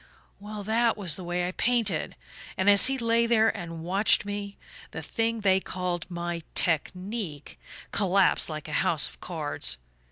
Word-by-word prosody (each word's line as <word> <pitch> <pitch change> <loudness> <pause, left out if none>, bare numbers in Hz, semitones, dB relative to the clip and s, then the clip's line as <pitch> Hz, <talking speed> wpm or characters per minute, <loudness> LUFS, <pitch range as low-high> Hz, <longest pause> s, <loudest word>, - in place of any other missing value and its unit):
Well 210 0 -7
that 225 +2 +1
was 180 -7 0
the 185 - -8
way 175 0 -2
I - - -3
painted; 220 -5 0 0.4
and 190 - 0
as 200 +5 +8
he 270 0 0
lay 230 -1 +2
there 225 -1 +3
and 165 -4 -7
watched 195 +4 +2
me, 205 0 -5 0.3
the - - -7
thing 230 -1 -1
they 190 -2 +3
called 180 -2 -4
my 175 -1 -4
'technique' 180 0 -2 0.3
collapsed 195 -2 +2
like 155 -1 -6
a - - -6
house - - +1
of - - -15
cards. 65 - -2
195 Hz, 160 wpm, -27 LUFS, 175-220 Hz, 0.4 s, as